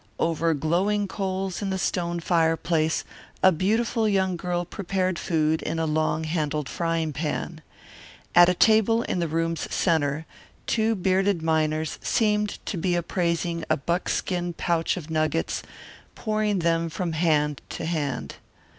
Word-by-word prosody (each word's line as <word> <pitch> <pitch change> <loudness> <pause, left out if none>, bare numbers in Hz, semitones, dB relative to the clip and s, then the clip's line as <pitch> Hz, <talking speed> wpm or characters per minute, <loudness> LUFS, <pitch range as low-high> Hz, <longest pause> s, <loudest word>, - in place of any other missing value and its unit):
Over 165 0 +1
glowing 190 +8 +1
coals 190 -1 -3
in 200 - -2
the 190 - -1
stone 175 -1 -1
fireplace 165 -1 +1 0.4
a 190 - +8
beautiful 220 +6 +1
young 190 -2 +1
girl 175 0 -2
prepared 185 -1 -2
food 160 -2 +1
in - - -3
a 165 - 0
long 155 0 0
handled 155 -3 -1
frying 165 -1 -1
pan. 155 +2 -3 0.7
At 175 0 +8
a 180 - +2
table 220 +3 +4
in - - -2
the 170 - 0
room's 165 +1 -2
centre 155 -3 +1 0.4
two 225 0 +1
bearded 190 -2 +1
miners 155 -1 0
seemed 210 -2 +1
to 190 - -3
be 175 +1 0
appraising 170 -1 -1
a - - +3
buckskin 175 +2 -1
pouch 170 +1 0
of 160 -2 -7
nuggets, 155 - 0 0.5
pouring 215 -1 0
them 165 0 +2
from 170 +1 -3
hand 150 -3 +1
to - - -5
hand. 145 - -3
170 Hz, 140 wpm, -25 LUFS, 160-190 Hz, 0.7 s, a